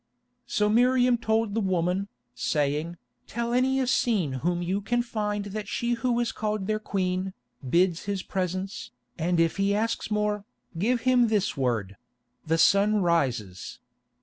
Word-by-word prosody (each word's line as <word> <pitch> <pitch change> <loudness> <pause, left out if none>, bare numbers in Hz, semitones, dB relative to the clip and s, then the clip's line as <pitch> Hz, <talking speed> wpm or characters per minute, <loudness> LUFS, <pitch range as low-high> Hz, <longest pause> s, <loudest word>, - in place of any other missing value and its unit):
So 210 - +1
Miriam 245 +3 +4
told 220 -2 0
the 225 - +1
woman, 185 0 0 0.3
saying, 150 +5 -1 0.3
"Tell 235 +1 -2
any 260 +2 +2
Essene 215 - +1
whom 175 +4 -1
you 190 +4 -1
can 240 +4 0
find 210 -3 -2
that 210 -1 -4
she 240 +3 -1
who 240 0 0
is 240 -1 0
called 210 -2 -2
their 215 +1 0
Queen, 185 -2 -2 0.4
bids 175 +2 +2
his 200 -2 -2
presence, 185 +1 -3 0.3
and 170 +1 +1
if 165 +2 +2
he 200 +1 +2
asks 225 +2 -1
more, 210 -1 0 0.3
give 230 +8 +1
him 250 -1 +4
this 210 -3 0
word—'The 125 - -3
sun 200 +4 +4
rises. 125 - -1
200 Hz, 145 wpm, -27 LUFS, 170-225 Hz, 0.4 s, Miriam